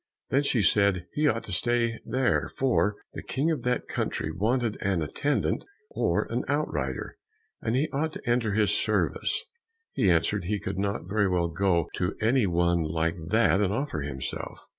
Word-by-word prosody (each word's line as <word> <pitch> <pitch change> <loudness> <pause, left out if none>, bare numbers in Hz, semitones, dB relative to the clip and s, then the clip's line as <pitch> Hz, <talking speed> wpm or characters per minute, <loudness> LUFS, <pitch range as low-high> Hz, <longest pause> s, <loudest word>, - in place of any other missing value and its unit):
Then 140 - +4
she 125 -6 +1
said 100 -4 +3
he 150 0 +2
ought 115 -5 +1
to - - -8
stay 115 +4 +1
there, 130 -1 +1
for 120 -6 +2 0.2
the - - -6
King 145 +5 0
of 150 -6 -1
that 125 0 -1
country - - -2
wanted 115 +1 0
an 95 -4 +1
attendant 145 - 0 0.3
or - - +1
an - - 0
outrider, - - -2 0.4
and 115 +1 0
he 140 +5 +2
ought 155 +3 -1
to - - -9
enter 120 -3 +2
his 105 0 +3
service. - - 0 0.5
He 105 -8 +2
answered 90 +3 +2
he 105 +3 -1
could 95 0 -4
not 100 -2 -2
very 100 0 +2
well 85 -2 +1
go 85 -1 +1
to 90 +1 -1
any 115 0 +3
one 85 0 +2
like 80 +2 -1
that 110 -1 +3
and 100 -2 +2
offer 135 - -2
himself. 65 -2 -5
105 Hz, 175 wpm, -27 LUFS, 90-125 Hz, 0.5 s, Then